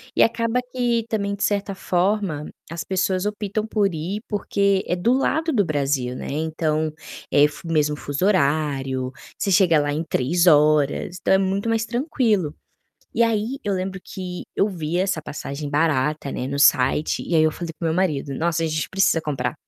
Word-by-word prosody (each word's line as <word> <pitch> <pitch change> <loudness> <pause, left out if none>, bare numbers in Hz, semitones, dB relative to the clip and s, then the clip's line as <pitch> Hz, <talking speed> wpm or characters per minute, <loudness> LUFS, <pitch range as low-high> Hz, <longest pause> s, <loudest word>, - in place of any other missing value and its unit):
E - - +3
acaba 230 +1 +1
que 240 -3 +1
também 200 -2 -1
de 200 - -4
certa 200 -1 0
forma, 185 -4 0 0.2
as 170 -1 -4
pessoas 185 +2 0
optam 210 0 -2
por 205 -4 +1
ir, 180 +7 -4
porque 200 -2 +1
é 175 - +1
do 220 +8 +2
lado 315 +5 +1
do 210 -8 +2
Brasil, 140 -5 -1
né. - - -6
Então, 155 0 -1 0.4
é 145 +1 +6
fu 150 +3 -11
o 165 - -3
mesmo 150 -1 +2
fuso 145 +5 -2
horário, 140 -7 +1 0.3
você 200 - -1
chega 180 -4 +5
lá 145 0 0
em 155 +3 -1
3 165 +4 +1
horas, 150 +2 +3
então, - - +2
é - - +6
muito 195 +2 -1
mais 225 -1 +1
tranquilo. 230 - 0 0.6
E 235 - +2
aí 230 +3 0
eu 205 - 0
lembro 190 0 -3
que 180 -2 -6
eu 205 - +2
vi 170 -1 -2
essa 190 -3 0
passagem 145 -1 -6
barata, 150 -1 0
né, 125 - -3
no 140 +1 -3
site 140 +2 +3
e - - -2
aí 160 - +5
eu 155 0 +3
falei 170 +1 -6
para 165 - -5
o - - +2
meu - - 0
marido 150 -7 0
"Nossa 165 +2 0
a - - +1
gente 155 0 -2
precisa 190 -3 +2
comprar, 135 -6 -2
175 Hz, 190 wpm, -22 LUFS, 150-200 Hz, 0.6 s, é